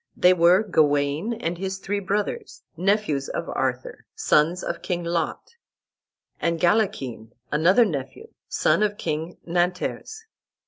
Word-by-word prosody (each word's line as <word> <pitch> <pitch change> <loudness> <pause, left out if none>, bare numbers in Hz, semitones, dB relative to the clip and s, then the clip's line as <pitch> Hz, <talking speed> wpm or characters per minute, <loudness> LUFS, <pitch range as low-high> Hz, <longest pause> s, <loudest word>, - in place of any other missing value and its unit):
They 180 +1 +6
were 180 +3 +5
Gawain 150 +1 +1
and 175 -6 -3
his 190 0 -3
three 200 +1 -3
brothers, 210 - -3
nephews 180 -6 0
of - - -4
Arthur, - - -3
sons 175 - +2
of 170 - -4
King 175 -1 -2
Lot, 170 - -2 0.9
and 170 -1 0
Galachin, 165 - 0 0.2
another 180 +10 +4
nephew, 160 - -5 0.2
son - - +2
of 205 -1 +1
King 160 +2 -4
Nanters. 180 - -2
180 Hz, 125 wpm, -24 LUFS, 160-205 Hz, 0.9 s, They